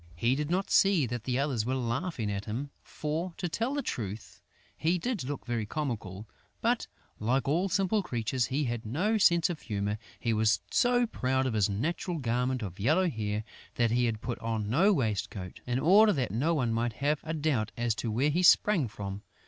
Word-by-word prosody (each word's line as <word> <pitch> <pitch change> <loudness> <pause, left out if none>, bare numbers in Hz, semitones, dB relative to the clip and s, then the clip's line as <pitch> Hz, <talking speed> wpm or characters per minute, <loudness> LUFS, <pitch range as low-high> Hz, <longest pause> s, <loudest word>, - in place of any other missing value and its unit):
He 115 +9 +2
did 145 +2 -2
not 185 +3 -1
see 195 -7 +4
that 120 -1 -5
the 125 -1 0
others 135 -5 0
were 130 +4 -1
laughing 120 - -2
at 100 0 -4
him, 130 +7 -4
for, 165 +3 -4
to 180 - -2
tell 230 - -2
the 285 - -1
truth, 105 - -5 0.3
he 170 +3 +1
did 215 - -2
look 140 +1 -5
very 120 -3 -2
comical; 110 -8 -4 0.3
but, - - +1 0.3
like 125 +4 0
all 175 +7 +1
simple 195 +3 +1
creatures, 120 - -1
he 140 +3 0
had 120 -3 -2
no 185 - 0
sense 170 -4 +5
of 170 -4 -5
humour. 105 -1 -2 0.2
He 115 -2 0
was 110 -1 +3
so 245 0 +3
proud 130 - 0
of 130 - -1
his 105 -2 +2
natural 165 - -2
garment 125 -1 -1
of 90 -2 -7
yellow 160 - +2
hair 105 -2 -2 0.3
that 115 -2 +2
he 120 +1 +2
had 110 -2 -2
put 120 - -4
on 110 -2 -2
no 185 - +4
waistcoat, 105 - -2
in 125 0 0
order 200 +9 +6
that 125 - -1
no 145 +11 +1
one 120 -6 0
might 115 0 0
have 145 +5 0
a 160 0 -3
doubt 145 -9 0
as 120 -1 +1
to 110 +2 -3
where 130 +7 +1
he 175 +4 +1
sprang 180 - +5
from. 100 -1 -6
125 Hz, 200 wpm, -29 LUFS, 110-165 Hz, 0.3 s, order